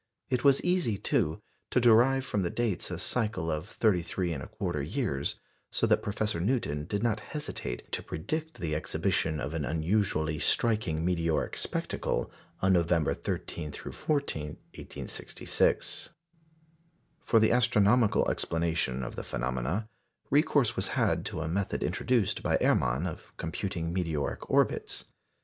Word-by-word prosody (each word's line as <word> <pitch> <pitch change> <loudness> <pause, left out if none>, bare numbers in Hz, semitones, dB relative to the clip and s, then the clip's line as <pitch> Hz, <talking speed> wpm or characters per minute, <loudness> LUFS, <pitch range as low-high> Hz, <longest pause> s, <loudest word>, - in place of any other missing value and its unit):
It 125 -2 +1
was 140 -1 +5
easy, 175 - +1
too, 80 -4 0 0.3
to - - +3
derive 125 +3 +5
from 105 - 0
the 85 - 0
dates 115 -4 -1
a 90 - -3
cycle 105 -4 -1
of 80 +3 -3
33 90 -5 0
1/4 70 -5 -3
years, - - 0 0.3
so - - +1
that - - +3
Professor 105 -3 -1
Newton 85 - 0
did 100 +5 -2
not 110 -3 +1
hesitate 150 +7 -5
to - - -1
predict 155 - -4
the 80 -3 -3
exhibition 75 0 0
of 70 +2 -3
an 80 -2 -1
unusually 80 -1 0
striking 85 -3 +2
meteoric 85 -3 0
spectacle - - -2 0.3
on 95 0 +5
November 85 -3 +3
13 75 -3 -4
14, 140 - -2 0.3
1866. - - -1 1.1
For 115 - +4
the 110 - +4
astronomical 115 -2 +4
explanation 80 -6 0
of - - -5
the - - -4
phenomena, 65 - -2 0.4
recourse 145 -4 +3
was - - -1
had - - +2
to 80 - -3
a 80 - -2
method 95 +4 -1
introduced 120 -6 +1
by - - +2
Erman 65 +7 +2
of 85 - -7
computing 85 0 -3
meteoric 80 -6 -2
orbits. - - +1
90 Hz, 135 wpm, -29 LUFS, 80-115 Hz, 1.1 s, was